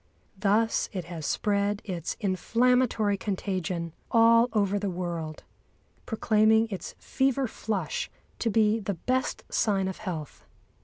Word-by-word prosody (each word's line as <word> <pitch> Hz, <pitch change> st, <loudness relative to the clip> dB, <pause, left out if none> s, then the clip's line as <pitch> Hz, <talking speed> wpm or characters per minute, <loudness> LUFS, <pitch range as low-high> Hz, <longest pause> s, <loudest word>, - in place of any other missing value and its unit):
Thus 215 Hz, +3 st, +2 dB
it 185 Hz, -4 st, -4 dB
has 165 Hz, -3 st, -5 dB
spread 205 Hz, 0 st, 0 dB
its 175 Hz, -5 st, -4 dB
inflammatory 230 Hz, +1 st, +2 dB
contagion 185 Hz, -4 st, -3 dB, 0.2 s
all 230 Hz, +1 st, +5 dB
over 205 Hz, -2 st, +1 dB
the 200 Hz, -1 st, -2 dB
world, 170 Hz, -3 st, -4 dB, 0.6 s
proclaiming 220 Hz, 0 st, +3 dB
its 185 Hz, -4 st, -6 dB
fever 270 Hz, 0 st, 0 dB
flush 205 Hz, -7 st, -3 dB, 0.3 s
to 230 Hz, -, +1 dB
be 220 Hz, 0 st, +3 dB
the 200 Hz, -2 st, -3 dB
best 255 Hz, +9 st, -1 dB
sign 195 Hz, -3 st, +1 dB
of 190 Hz, -, -4 dB
health. 165 Hz, -8 st, -6 dB
205 Hz, 120 wpm, -27 LUFS, 185-225 Hz, 0.6 s, all